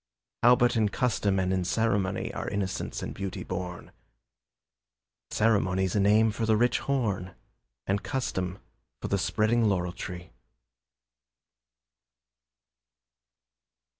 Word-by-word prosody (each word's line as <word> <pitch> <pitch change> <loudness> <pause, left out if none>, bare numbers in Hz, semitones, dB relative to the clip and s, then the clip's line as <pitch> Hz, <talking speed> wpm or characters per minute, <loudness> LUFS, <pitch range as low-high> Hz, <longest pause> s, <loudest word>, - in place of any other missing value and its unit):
How 120 +1 +7
but 120 0 +2
in 110 -2 +2
custom 105 -4 0
and 95 0 +1
in 95 -1 0
ceremony 100 -1 0
Are - - -4
innocence 100 -2 -3
and - - -4
beauty 95 -1 -5
born? 90 -1 -6 1.4
Ceremony's 95 -4 +1
a - - +3
name 105 +3 +4
for 110 +1 -2
the 110 -1 +4
rich 120 +2 +2
horn, 105 -9 -1 0.5
And 100 +1 0
custom 95 -9 -2 0.4
for - - -5
the 100 - +1
spreading 110 +4 +2
laurel 90 -4 0
tree. 90 -1 -7
100 Hz, 110 wpm, -28 LUFS, 95-115 Hz, 1.4 s, How